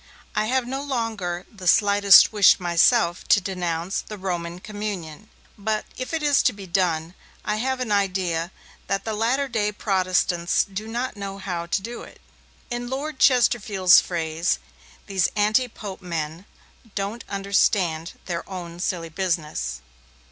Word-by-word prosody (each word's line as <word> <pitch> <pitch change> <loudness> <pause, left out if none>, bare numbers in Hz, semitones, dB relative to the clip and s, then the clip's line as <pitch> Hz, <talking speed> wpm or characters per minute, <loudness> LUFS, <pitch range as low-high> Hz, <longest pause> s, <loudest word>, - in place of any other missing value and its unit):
I 215 - +1
have 255 +2 +1
no 270 +2 -3
longer 220 -10 -3
the 185 -2 -7
slightest 200 +1 +7
wish 205 -2 +6
myself 175 +2 +3
to - - +6
denounce 180 -2 -2
the 210 - -9
Roman 175 -3 -4
communion, 205 -3 -6 0.3
but, 215 +1 -1
if 255 - -5
it 325 -2 -2
is 290 -2 +4
to 250 - +2
be 200 -2 -10
done, 170 -2 0 0.3
I 210 - 0
have 260 +3 -1
an 250 -4 -3
idea 185 -4 0 0.4
that 195 0 -1
the 220 - -2
latter 240 +6 +1
day 215 -4 0
Protestants 185 -3 +1
do 205 +2 -7
not 240 +1 -3
know 195 -1 -5
how 180 -3 -4
to 180 - 0
do 235 +2 -6
it. - - -13 0.5
In 240 0 -3
Lord 280 +2 -4
Chesterfield's 215 -7 +5
phrase, 165 -1 -1 0.5
these 190 -3 +1
anti 215 +5 +3
Pope 205 -4 -8
men 165 0 -4 0.5
'don't 200 +4 -3
understand 195 -4 +1
their 170 -2 -3
own 175 -3 -7
silly 175 -2 -2
business'. 160 - -2
195 Hz, 150 wpm, -24 LUFS, 175-220 Hz, 0.5 s, slightest